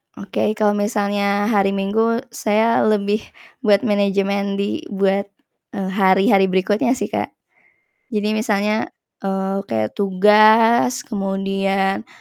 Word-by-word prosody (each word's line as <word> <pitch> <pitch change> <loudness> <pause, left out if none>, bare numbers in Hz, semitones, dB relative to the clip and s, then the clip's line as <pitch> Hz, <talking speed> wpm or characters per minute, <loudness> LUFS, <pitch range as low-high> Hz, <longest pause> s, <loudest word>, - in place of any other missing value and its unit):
Oke, 200 +2 -2
kalau 210 -1 +2
misalnya 205 0 -1
hari 195 -2 +1
Minggu 225 +5 0
saya 225 +1 +1
lebih 210 0 +1 0.4
buat 210 -5 +2
manajemen 200 -2 0
di 200 +1 -2
buat, 195 0 0 0.5
eee, 190 -1 -3
hari-hari 195 +1 +3
berikutnya 205 +6 +1
sih, - - -5
Kak. - - -4 0.8
Jadi 210 0 -1
misalnya, 215 0 0 0.4
eee, 195 0 -2
kayak 110 -1 -3
tugas 215 +5 +4
kemudian, 195 -1 -2
200 Hz, 110 wpm, -19 LUFS, 195-215 Hz, 0.8 s, tugas